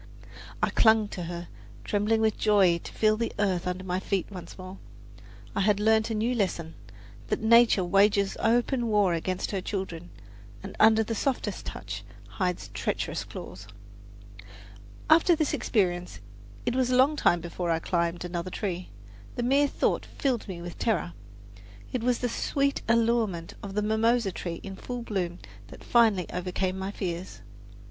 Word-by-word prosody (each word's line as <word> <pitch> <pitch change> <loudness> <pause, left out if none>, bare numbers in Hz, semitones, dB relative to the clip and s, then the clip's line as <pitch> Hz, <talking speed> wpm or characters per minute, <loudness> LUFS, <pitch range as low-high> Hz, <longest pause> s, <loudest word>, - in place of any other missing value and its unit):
I - - +2
clung 220 -2 +4
to 175 - -5
her, 175 0 -6 0.4
trembling 215 +2 +1
with 220 -2 +2
joy 195 -5 +4
to - - -10
feel 215 0 +2
the 230 0 -1
earth 190 -4 0
under 180 +1 -3
my 185 0 -1
feet 190 -1 -1
once 180 -3 -9
more. 185 0 -9 0.8
I - - 0
had 205 0 +3
learned 220 +1 +3
a 225 - -1
new 225 +4 0
lesson 170 -7 -1 0.5
that - - -1
nature 230 -3 +6
"wages 200 +2 +3
open 240 +2 +1
war 205 -5 +3
against 185 +2 -2
her 195 -2 -2
children, 180 -3 -5 0.5
and - - -8
under 220 +1 +6
softest 260 +4 -2
touch - - -6 0.2
hides 180 -3 -3
treacherous - - -2
claws." - - -9 1.4
After 330 +2 +6
this 310 -2 0
experience 175 - 0 0.5
it 240 - +1
was 260 -1 +2
a 255 - +2
long 270 +4 +5
time 175 -11 +3
before 170 +1 -4
I 165 - +2
climbed 170 +1 -1
another 175 +1 -4
tree. 185 -2 -4 0.5
The 240 - -2
mere 275 +4 +3
thought - - 0
filled 255 -5 -2
me 175 -3 -6
with 175 -1 -8
terror. 185 - 0 0.8
It 250 - -1
was 245 0 +1
the 250 - +1
sweet 280 +4 0
allurement 230 -7 +1
of 195 -1 -7
the 210 - +1
mimosa 220 0 +2
tree 170 -1 -5
in 195 -1 -7
full 245 -1 -5
bloom 180 -6 -2 0.3
that - - -13
finally 220 -7 +3
overcame 185 +1 -2
my 190 +1 -3
fears. 180 -2 -5
200 Hz, 160 wpm, -27 LUFS, 180-230 Hz, 1.4 s, nature